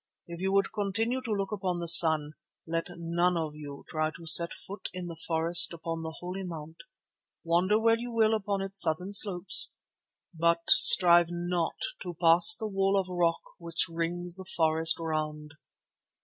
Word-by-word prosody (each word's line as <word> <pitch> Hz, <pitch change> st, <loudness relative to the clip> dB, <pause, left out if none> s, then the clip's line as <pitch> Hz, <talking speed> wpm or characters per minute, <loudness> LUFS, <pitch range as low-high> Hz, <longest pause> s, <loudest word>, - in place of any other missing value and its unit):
If 170 Hz, 0 st, -11 dB
you 190 Hz, 0 st, -3 dB
would 195 Hz, 0 st, -1 dB
continue 225 Hz, +5 st, -4 dB
to 240 Hz, -3 st, -8 dB
look 200 Hz, -1 st, -4 dB
upon 190 Hz, -4 st, -5 dB
the 170 Hz, 0 st, -7 dB
sun, 160 Hz, -3 st, +6 dB, 0.3 s
let 165 Hz, 0 st, -5 dB
none 170 Hz, +1 st, -2 dB
of 160 Hz, -2 st, -6 dB
you 145 Hz, -2 st, -12 dB
try 155 Hz, 0 st, -4 dB
to 165 Hz, +1 st, -15 dB
set 170 Hz, +1 st, +3 dB
foot 200 Hz, +2 st, -10 dB
in 180 Hz, -1 st, -8 dB
the 170 Hz, -1 st, -10 dB
forest 165 Hz, +1 st, +3 dB
upon 165 Hz, 0 st, -8 dB
the 160 Hz, 0 st, -9 dB
Holy 180 Hz, +2 st, -8 dB
Mount. 165 Hz, -3 st, -10 dB, 0.7 s
Wander 180 Hz, +5 st, -1 dB
where 230 Hz, 0 st, 0 dB
you 240 Hz, +1 st, -8 dB
will 225 Hz, -1 st, 0 dB
upon 200 Hz, -2 st, -4 dB
its 195 Hz, 0 st, -3 dB
southern 180 Hz, +5 st, -1 dB
slopes, 195 Hz, -2 st, +4 dB, 0.6 s
but 170 Hz, 0 st, -2 dB
strive 175 Hz, -2 st, +7 dB
not 175 Hz, -1 st, -5 dB, 0.3 s
to 175 Hz, -, -9 dB
pass 170 Hz, -, +6 dB
the 225 Hz, -, -8 dB
wall 195 Hz, -1 st, -2 dB
of 185 Hz, -1 st, -6 dB
rock 175 Hz, -2 st, -3 dB, 0.2 s
which 170 Hz, -1 st, -3 dB
rings 170 Hz, +2 st, -6 dB
the 190 Hz, -, -12 dB
forest 160 Hz, 0 st, +1 dB
round." 155 Hz, -2 st, -6 dB
175 Hz, 170 wpm, -26 LUFS, 165-195 Hz, 0.7 s, strive